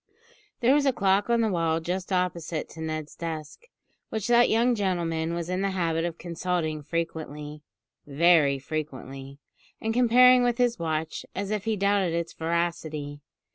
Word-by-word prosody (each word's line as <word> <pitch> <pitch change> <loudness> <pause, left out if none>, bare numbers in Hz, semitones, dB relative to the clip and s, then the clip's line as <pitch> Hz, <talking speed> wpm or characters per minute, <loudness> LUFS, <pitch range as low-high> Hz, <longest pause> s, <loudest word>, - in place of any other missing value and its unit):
There 245 +3 +5
was 285 -1 +3
a - - +5
clock 200 -2 +1
on 235 -1 +3
the 220 -2 +1
wall 165 -2 +1
just 180 +3 -4
opposite 175 -3 -1
to 160 - -10
Ned's 155 -1 -4
desk, 160 - -6 0.4
which 220 -2 -3
that 240 0 +5
young 235 +3 +3
gentleman 170 -5 -1
was 170 -1 -3
in 185 +1 -1
the 195 - +1
habit 165 -1 0
of 170 -1 -4
consulting 170 -2 -2
frequently 150 -2 -5 0.5
very 150 -1 +4
frequently 135 -2 -6 0.4
and 225 0 -2
comparing 250 +1 +6
with 245 -1 +1
his 245 -4 +1
watch, 160 -1 -2
as 200 +1 -3
if 210 -1 -2
he 220 -1 0
doubted 200 -3 +1
its 170 0 -3
veracity. 160 -3 -3
170 Hz, 160 wpm, -26 LUFS, 160-205 Hz, 0.5 s, comparing